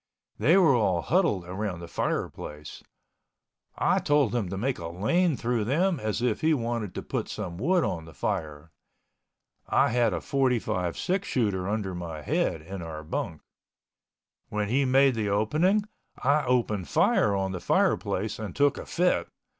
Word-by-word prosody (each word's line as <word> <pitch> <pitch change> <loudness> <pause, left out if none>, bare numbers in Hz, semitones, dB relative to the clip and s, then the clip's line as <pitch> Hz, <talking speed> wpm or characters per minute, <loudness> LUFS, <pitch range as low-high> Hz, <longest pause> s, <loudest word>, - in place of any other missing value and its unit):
They 170 +6 +5
were 165 -7 +5
all 95 -8 +1
huddled 165 - +1
around 95 0 -4
the 85 - -8
fireplace. 75 -2 -4 0.9
I - - +2
told 145 -6 +2
him 115 -7 -1
to 95 - -4
make 125 +6 -1
a 85 - -5
lane 130 - +1
through 120 -2 -1
them 165 - +1
as 110 +1 -2
if 120 -4 0
he 155 0 +3
wanted 115 -6 -3
to - - -4
put - - -3
some 90 -5 -5
wood 175 - +2
on 80 -3 -2
the 80 - -13
fire. 80 -5 -3 1.0
I - - +4
had 120 -1 +2
a - - -2
45 120 -10 0
six 195 +2 -1
shooter 100 -6 0
under 105 -3 -2
my 85 -4 -6
head 80 +3 -1
on 95 -1 -6
our 80 -2 -7
bunk. 80 +1 -4 1.1
When 105 -1 -2
he 135 +4 +2
made 135 +1 +4
the 110 -3 -1
opening 155 - +2 0.3
I 145 +2 +2
opened 115 -7 0
fire 100 -1 +3
on 95 -1 -1
the 90 -2 -5
fireplace 105 +4 0
and 105 -4 -6
took 145 0 +2
a - - -8
fit. 180 +1 +1
110 Hz, 165 wpm, -27 LUFS, 90-135 Hz, 1.1 s, They